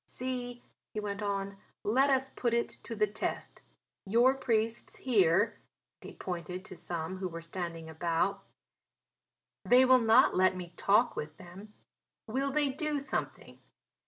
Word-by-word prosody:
See," 245 -1 -5 0.3
he - - -1
went 205 0 -4
on, 200 -1 -2 0.3
"let 265 +7 +3
us 265 -1 +2
put 240 -3 -1
it 235 - 0 0.2
to 230 - -5
the 210 0 +3
test. 210 +1 -5 0.4
Your 235 +6 +4
priests 230 -3 -1
here," 205 -5 +2 0.4
and - - -9
he - - -13
pointed 180 0 -5
to - - -10
some 170 +1 -4
who 185 0 -3
were 165 -1 -7
standing 165 -1 -5
about, 170 +5 -1 1.2
"they 255 +1 +6
will 255 0 +6
not 230 +3 +5
let 185 0 +4
me 180 -1 -7
talk 215 +5 +3
with 150 +1 -6
them; 190 +4 -12 0.5
will 265 +5 -1
they 290 0 +2
do 295 +2 -2
something. 280 - -5
210 Hz, 150 wpm, -31 LUFS, 180-250 Hz, 1.2 s, they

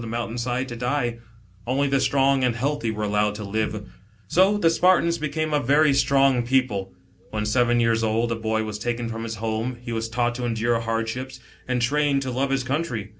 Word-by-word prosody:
the 115 - -6
mountain 115 +1 -3
side 125 +2 -2
to 120 - -6
die. 120 -1 -1 0.5
Only 135 +3 +1
the 135 0 +2
strong 135 0 +2
and 125 -2 +1
healthy 140 0 -1
were 105 -1 -3
allowed 105 0 +1
to 105 - -6
live. 105 0 -3 0.4
So 190 - +3
the 165 -5 +3
Spartans 170 -1 +3
became 155 +1 -2
a 150 - +3
very 145 +3 +3
strong 135 -2 +3
people. 120 -7 0 0.4
When 105 -1 -3
seven 120 +2 +2
years 115 -1 +2
old, 115 +2 0
a - - 0
boy 110 0 -1
was 105 -1 -5
taken 120 +1 -2
from 115 0 -5
his 115 -1 -4
home, 115 +3 -3
he 120 0 -7
was 115 0 -2
taught 120 +1 0
to 125 - -3
endure 115 0 0
hardships, 115 +3 -3 0.3
and 125 -1 0
trained 140 +2 +1
to 130 - -3
love 135 +2 -1
his 135 -1 0
country. 130 -6 -3
120 Hz, 205 wpm, -24 LUFS, 115-135 Hz, 0.5 s, So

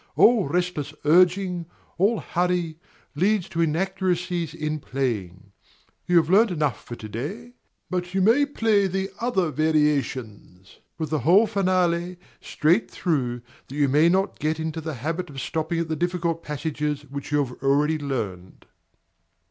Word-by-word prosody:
All 225 - +5
restless 155 -3 -2
urging, 180 +1 +3 0.3
all 205 +4 +2
hurry, 175 -2 -1 0.3
leads 190 +5 +1
to 170 - -1
inaccuracies 180 0 -1
in 155 -1 -3
playing. 105 -10 -3 0.6
You 175 - +4
have 160 -3 +4
learned 210 +6 +5
enough 150 - -1
for 120 - -7
to 110 - -9
day; 180 - -6 0.3
but 180 0 -3
you - - +2
may 255 +8 +4
play 220 -7 +2
the 190 +1 -2
other 195 -9 0
variations, 135 - -1 0.2
with 160 -3 -4
the 155 - +1
whole 180 - +5
finale, 180 -4 0 0.2
straight 170 +8 +1
through, 125 -8 -1 0.2
that 135 - -9
you 145 -1 +3
may 150 +5 +4
not 190 +2 0
get 155 +1 -1
into 160 0 -3
the 160 -1 -5
habit 165 +8 -3
of 135 -2 -8
stopping 160 +4 -2
at 165 -1 -1
the 160 - -2
difficult 170 0 -1
passages 150 -1 -3
which 140 +1 -8
you 150 - +3
have 125 -1 -12
already 145 +3 +2
learned. 105 -11 -5
160 Hz, 150 wpm, -24 LUFS, 145-180 Hz, 0.6 s, All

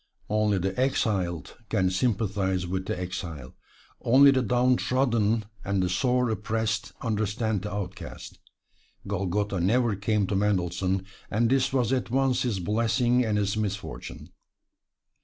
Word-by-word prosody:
Only 105 -1 +2
the 95 +1 -2
exiled 95 - -1
can 95 -4 +1
sympathize 95 -3 0
with 95 +1 -3
the - - -2
exile 85 -7 -6 0.5
only 135 +4 +7
the 130 -1 +2
downtrodden 120 -2 +2 0.2
and 100 -1 0
the 90 - 0
sore 125 +3 +1
oppressed 110 0 -2
understand 110 -1 -1
the 105 - -5
outcast. 95 -3 -7 0.7
Golgotha 100 0 -1
never 115 +5 +2
came 105 +1 0
to 100 - -2
Mendelssohn, 95 -1 0 0.2
and 115 +3 +1
this 130 -1 +2
was 130 -2 +1
at 130 -3 -1
once 130 0 +1
his 120 -6 -1
blessing 115 +6 +2
and 110 -3 0
his 100 0 0
misfortune. 105 -2 -5
105 Hz, 130 wpm, -27 LUFS, 95-120 Hz, 0.7 s, only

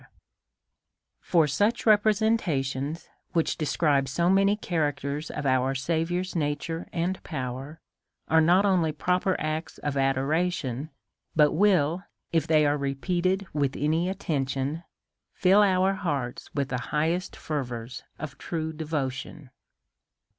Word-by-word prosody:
175 - - -19
For 165 -4 +5
such 205 - +1
representations, 190 - +1 0.3
which 165 -2 +1
describe 145 -3 +1
so 170 +6 +2
many 195 +1 +4
characters 150 -5 -2
of 150 - -5
our 130 0 +2
Saviour's 165 +6 -1
nature 160 +2 -2
and 180 +2 -2
power, 135 +1 -5 0.5
are 160 0 +4
not 180 +5 +4
only 180 -5 +2
proper 180 +5 0
acts 155 +1 -3
of 145 -1 -3
adoration, 135 +1 0 0.5
but 150 -2 +5
will, 180 -2 +2 0.3
if 165 -1 +2
they 155 -2 +4
are 145 0 +2
re 140 0 -1
peated 185 +5 0
with 140 -2 0
attention, 155 -3 -1 0.6
till 195 +2 +6
our 190 -1 +3
hearts 145 -10 -3
with 140 -2 -1
the 125 - -2
highest 165 +5 0
fervours 125 -5 -4 0.2
of 140 -3 -7
true 160 -1 -3
devotion. 145 -3 -4
155 Hz, 120 wpm, -27 LUFS, 140-180 Hz, 0.6 s, till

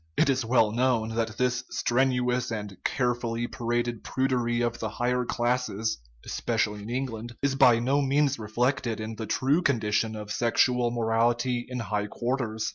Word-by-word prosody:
It 140 - +4
is 130 -1 0
well 115 -2 +3
known 120 -1 +1
that 115 0 -2
this 125 0 +1
strenuous 125 -1 +1
and 105 -3 -4
carefully 120 -2 0
paraded 120 -1 -2
prudery 125 -3 0
of 120 -1 -1
the 110 - -2
higher 125 +2 0
classes 120 - -1 0.3
(especially 105 0 -1
in 105 - -8
England) 120 -2 -4
is 140 -1 +2
by 130 -4 +6
no 135 +5 +1
means 140 -1 +2
reflected 115 +1 -1
in 110 +1 -5
the 110 - -5
true 140 - +2
condition 110 - +1
of 105 -1 -7
sexual 120 +2 +2
morality 120 +1 +1
in 125 - -4
high 105 -1 -2
quarters. 120 -1 -2
120 Hz, 155 wpm, -27 LUFS, 110-125 Hz, 0.3 s, by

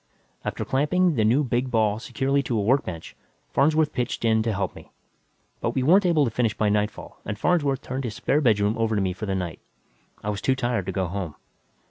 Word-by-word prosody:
After - - -3
clamping 170 +6 +2
the 115 -6 +1
new 120 +7 +3
big 125 0 -1
ball 110 -3 +1
securely 135 +4 0
to 120 -4 -2
a - - +1
workbench, 100 - -1 0.4
Farnsworth 155 +1 +3
pitched 120 -1 -2
in 110 -1 +3
to 115 +1 0
help 100 -2 -2
me. - - -13 0.7
But - - -2
we 130 - +1
weren't 185 +7 +5
able 155 -4 +3
to 115 - -2
finish 115 -2 0
by 105 - +2
nightfall 105 +1 -2
and 105 - -4
Farnsworth 145 -2 +1
turned 130 +1 -4
his 110 -3 -4
spare 150 - +1
bedroom 105 -4 +3
over 115 -1 +1
to 100 - +1
me 95 -1 0
for 100 +4 -6
the 95 - 0
night. 90 -3 -4 0.6
I 105 - -1
was 100 - -5
too 130 - +2
tired 120 -7 -1
to - - -1
go 95 0 -1
home. 90 -3 -4
115 Hz, 215 wpm, -25 LUFS, 105-135 Hz, 0.7 s, weren't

